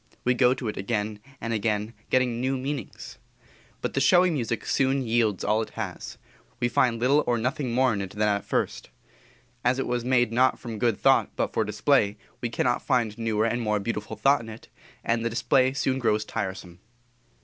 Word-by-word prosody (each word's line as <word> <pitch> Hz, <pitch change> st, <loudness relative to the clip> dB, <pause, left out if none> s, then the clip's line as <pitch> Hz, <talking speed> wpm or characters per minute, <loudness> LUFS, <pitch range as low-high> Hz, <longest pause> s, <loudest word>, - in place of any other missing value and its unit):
We 125 Hz, -, +3 dB
go 125 Hz, 0 st, +3 dB
to 125 Hz, -3 st, -5 dB
it 105 Hz, -, -4 dB
again 105 Hz, +1 st, -2 dB, 0.2 s
and 115 Hz, 0 st, -3 dB
again, 105 Hz, 0 st, -1 dB, 0.2 s
getting 125 Hz, -2 st, +1 dB
new 130 Hz, +1 st, 0 dB
meanings. 130 Hz, -, -6 dB, 0.6 s
But -, -, -3 dB
the -, -, +1 dB
showy 180 Hz, +5 st, +5 dB
music 120 Hz, -7 st, -2 dB
soon 135 Hz, 0 st, +1 dB
yields 115 Hz, -4 st, +1 dB
all 105 Hz, +1 st, +2 dB
it 110 Hz, -, -5 dB
has; -, -, -5 dB, 0.4 s
we 120 Hz, -, +1 dB
find 120 Hz, -1 st, +2 dB
little 140 Hz, +5 st, +3 dB
or 120 Hz, -1 st, +2 dB
nothing 125 Hz, +2 st, -2 dB
more 125 Hz, 0 st, +3 dB
in 100 Hz, -, -2 dB
it 95 Hz, -, -5 dB
than 105 Hz, +2 st, 0 dB
at 100 Hz, -1 st, 0 dB
first. -, -, -2 dB, 0.7 s
As 125 Hz, +1 st, +2 dB
it 135 Hz, -, -1 dB
was 120 Hz, -1 st, -1 dB
made 120 Hz, -2 st, +2 dB
not 130 Hz, +3 st, +3 dB
from 115 Hz, -3 st, -7 dB
good 115 Hz, -3 st, +1 dB
thought -, -, +4 dB
but -, -, -1 dB
for 110 Hz, -, +1 dB
display, 105 Hz, 0 st, +1 dB, 0.2 s
we 120 Hz, -, -2 dB
cannot 120 Hz, +1 st, 0 dB
find 120 Hz, -6 st, 0 dB
newer 110 Hz, -1 st, 0 dB
and 115 Hz, +1 st, 0 dB
more 105 Hz, -2 st, 0 dB
beautiful 105 Hz, +1 st, -4 dB
thought 140 Hz, -1 st, +3 dB
in 115 Hz, -, -9 dB
it, 110 Hz, +1 st, -11 dB, 0.3 s
and 115 Hz, 0 st, 0 dB
the 115 Hz, -, 0 dB
display 125 Hz, +3 st, +2 dB
soon 135 Hz, -1 st, -1 dB
grows 110 Hz, -3 st, +1 dB
tiresome. 95 Hz, -3 st, -5 dB
120 Hz, 195 wpm, -26 LUFS, 110-130 Hz, 0.7 s, showy